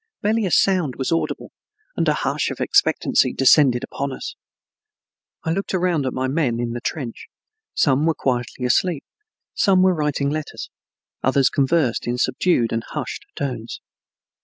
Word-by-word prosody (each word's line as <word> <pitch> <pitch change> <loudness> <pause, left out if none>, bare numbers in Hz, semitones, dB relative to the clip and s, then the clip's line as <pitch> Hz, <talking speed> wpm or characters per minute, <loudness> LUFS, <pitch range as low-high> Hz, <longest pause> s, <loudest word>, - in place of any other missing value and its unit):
Barely 215 0 +1
a - - -4
sound 175 -10 +2
was 130 - -3
audible, 165 - -2 0.4
and - - 0
a - - +3
hush - - -1
of - - -6
expectancy - - +2
descended 135 -2 +4
upon 140 +1 -4
us. - - -6 1.1
I 160 - -1
looked 195 +2 -2
around 175 -6 +1
at 130 - -2
my 130 0 -1
men 130 -5 0
in 120 -1 -2
the 120 0 -5
trench; 130 -5 -5 0.5
some 145 +2 +2
were 165 - +2
quietly 125 -1 -2
asleep, 155 +4 +1 0.5
some 190 -2 +3
writing 150 -5 +1
letters, 155 0 -5 0.5
others 135 +1 +3
conversed 135 -4 +1
in 120 +1 -1
subdued 130 -1 +1
and 115 0 -1
hushed - - -6
tones. 125 -5 -4
140 Hz, 150 wpm, -21 LUFS, 125-165 Hz, 1.1 s, descended